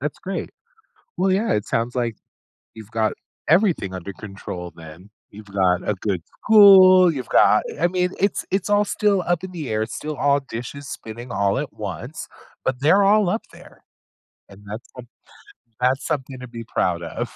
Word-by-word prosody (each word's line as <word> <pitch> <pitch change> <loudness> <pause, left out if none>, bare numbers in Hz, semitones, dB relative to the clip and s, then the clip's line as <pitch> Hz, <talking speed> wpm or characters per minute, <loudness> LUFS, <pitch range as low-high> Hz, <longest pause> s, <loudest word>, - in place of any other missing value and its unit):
That's 145 +1 -4
great. 195 +1 -5 0.7
Well, 190 - +1
yeah, 215 +4 +1
it 105 - -1
sounds 115 +1 -1
like, 120 -3 -2 0.6
you've 110 -1 -12
got 110 -1 0 0.3
everything 170 - +2
under 95 +1 -6
control 90 -4 -8
then. 80 +4 -13 0.2
You've 105 +1 -12
got 95 -2 +1
a - - +2
good 95 -2 -2 0.2
school, 190 -4 +8
you've 130 -3 -6
got - - +5 0.2
I - - +3
mean, 180 0 0
it's 200 +1 0
it's 195 +1 -1
all 205 0 +4
still 205 -2 +1
up 175 0 0
in 185 - -9
the 160 -7 -6
air, 110 0 -1
it's 110 - -6
still 155 0 -5
all 140 0 +3
dishes 135 +2 -8
spinning 120 +3 -8
all 100 -1 +1
at - - -3
once, - - -7 0.4
but 130 -1 -1
they're 165 +8 +5
all 205 -1 +4
up 220 +5 -1
there - - -16 0.7
and 100 +1 -15
that's 110 +4 -7
some 125 -1 -10 0.7
that's 130 +3 +1
something 135 -2 -3
to 125 - -9
be 115 -1 -8
proud 90 -5 -1
of. 115 +9 -5
125 Hz, 180 wpm, -22 LUFS, -, 0.7 s, school